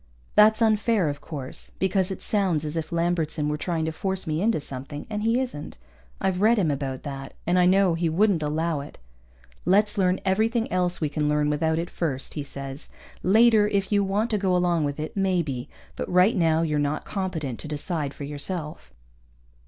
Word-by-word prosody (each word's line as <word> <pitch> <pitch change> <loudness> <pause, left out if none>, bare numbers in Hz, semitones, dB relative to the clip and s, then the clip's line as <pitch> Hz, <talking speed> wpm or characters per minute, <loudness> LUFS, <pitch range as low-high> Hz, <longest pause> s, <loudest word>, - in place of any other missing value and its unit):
That's 215 +2 +6
unfair, 215 -5 +2
of 145 0 -5
course, 140 -5 -6
because 190 0 +1
it 190 - -5
sounds 185 -7 +1
as 150 +1 -4
if 160 0 -3
Lambertson 165 -3 0
were 150 - 0
trying 160 +1 -2
to 160 - -1
force 190 +3 -3
me 155 +1 -1
into 225 -3 +2
something, 140 +1 -6
and 210 0 -2
he 230 +3 +2
isn't. 245 - -5 0.4
I've 190 -1 0
read 225 +3 +5
him 175 -7 +2
about 135 -2 -3
that, 135 -2 -7
and 180 +2 +2
I 180 - +5
know 190 -1 +4
he 165 0 0
wouldn't 185 +1 +2
allow 155 +1 -1
it. 140 - -9 0.7
Let's 205 +3 +2
learn 185 0 +2
everything 225 +4 +1
else 180 -1 0
we 155 - +1
can 150 0 -1
learn 150 0 +2
without 160 +2 +1
it 170 +1 -3
first, 135 -6 -3
he 150 - -3
says. 140 0 -7 0.3
_Later, 215 +1 +5
if 200 0 0
you 200 -1 +3
want 205 +4 0
to 210 - +1
go 190 -2 +1
along 175 -3 +1
with 145 +1 -3
it, 155 - -5
maybe. 170 -10 -1 0.3
But - - -4
right 180 +6 +5
now 165 -3 +2
you're 150 -2 0
not 145 +1 -1
competent 165 - -3
to - - -6
decide 150 -1 -3
for - - -7
yourself. 150 +2 -3
170 Hz, 195 wpm, -25 LUFS, 150-195 Hz, 0.7 s, That's